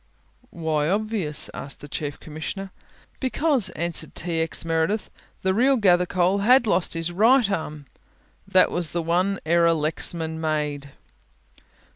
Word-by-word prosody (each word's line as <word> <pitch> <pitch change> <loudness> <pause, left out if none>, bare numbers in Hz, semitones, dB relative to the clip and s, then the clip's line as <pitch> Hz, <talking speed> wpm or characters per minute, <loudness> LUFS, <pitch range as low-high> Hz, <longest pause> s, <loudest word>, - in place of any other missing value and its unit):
"Why 155 -2 -1
obvious?" 205 -6 0
asked 140 - -7
the 145 - -9
Chief 145 0 -5
Commissioner. 165 +5 -6 0.5
"Because," 270 -2 +1
answered 170 0 0
T. 165 -1 -2
X. 160 0 -2
Meredith, 165 +6 -1 0.3
"the 190 0 +2
real 260 +6 +3
Gathercole 180 -1 +2
had 245 +4 +5
lost 180 -4 +1
his 165 +1 -2
right 230 +6 +4
arm 155 -5 -4 0.6
that 185 -1 +4
was 175 -3 0
the 170 -1 -1
one 180 +4 0
error 170 +1 +3
Lexman 160 +1 -2
made." 150 -3 -2
170 Hz, 130 wpm, -24 LUFS, 160-200 Hz, 0.6 s, had